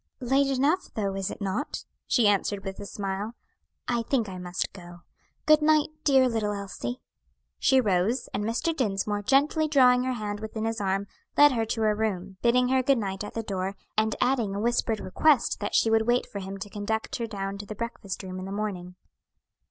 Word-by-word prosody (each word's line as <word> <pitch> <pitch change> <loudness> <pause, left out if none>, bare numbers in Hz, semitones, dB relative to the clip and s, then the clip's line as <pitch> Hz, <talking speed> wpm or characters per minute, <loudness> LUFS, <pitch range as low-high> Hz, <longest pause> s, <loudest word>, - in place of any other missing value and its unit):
"Late 270 +2 +2
enough 280 +7 +1
though, 200 -3 -1
is 195 -1 -2
it - - -8
not?" 205 - -3 0.2
she 235 -5 +4
answered 200 0 +1
with 195 0 -5
a 205 - -6
smile. 200 +3 -4 0.5
"I 240 -1 +1
think 230 -1 0
I 185 -1 -7
must 180 0 -3
go. 175 -2 -12 0.4
Good 305 0 +6
night, 305 0 +4
dear 265 -3 +5
little 220 -3 -1
Elsie." 190 -12 -5 0.6
She 265 - +4
rose, 215 +3 +1
and 205 - -1
Mr. 235 +9 -1
Dinsmore, 205 -5 -1
gently 285 +7 +3
drawing 250 -4 +5
her 255 - 0
hand 210 -3 -4
within 220 0 -4
his 225 -1 -2
arm, 195 0 0 0.3
led 290 0 +8
her 225 -3 0
to 225 - -2
her 215 -1 +3
room, 195 -3 -3
bidding 250 +1 +3
her 260 0 +3
good 270 +1 +3
night 195 -2 -3
at 210 - -8
the 225 - -2
door, 195 -1 -3 0.2
and 215 0 +1
adding 235 -7 +1
a - - -2
whispered 230 -1 +1
request 245 +8 +2
that 205 - -3
she 225 - +4
would 220 0 +3
wait 245 +1 +3
for 200 - -7
him 195 0 -6
to 195 +1 -7
conduct 220 +1 -2
her 235 -2 -3
down 200 -2 -4
to 205 - -8
the 215 - -6
breakfast 210 -4 -5
room 185 0 -6
in 185 - -6
the 195 - -6
morning. 195 -4 -4
215 Hz, 205 wpm, -27 LUFS, 195-250 Hz, 0.6 s, led